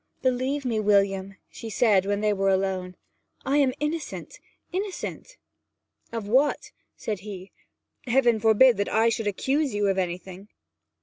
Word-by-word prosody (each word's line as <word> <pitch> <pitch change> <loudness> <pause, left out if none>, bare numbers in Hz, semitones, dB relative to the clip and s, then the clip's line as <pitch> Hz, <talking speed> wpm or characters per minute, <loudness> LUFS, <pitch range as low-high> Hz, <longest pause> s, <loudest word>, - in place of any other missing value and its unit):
'Believe 260 +2 0
me, 230 -3 0
William,' 195 -2 +1
she 225 - -9
said 205 -4 +3
when 205 0 0
they 210 -1 +2
were 195 -1 +1
alone, 190 -1 -1 0.5
'I 275 +2 +2
am 270 -3 +3
innocent 300 +2 -4 0.3
innocent!' 400 +5 -5 0.7
'Of 225 -3 -5
what?' 265 +7 +1 0.2
said 210 -3 -4
he. 195 -1 -9 0.6
'Heaven 240 -2 +3
forbid 225 +3 +5
that 200 - -1
I 225 +2 +3
should 225 -1 -2
accuse 270 +6 0
you 205 0 +1
of 190 0 +1
anything!' 185 +2 -5
215 Hz, 140 wpm, -25 LUFS, 195-260 Hz, 0.7 s, forbid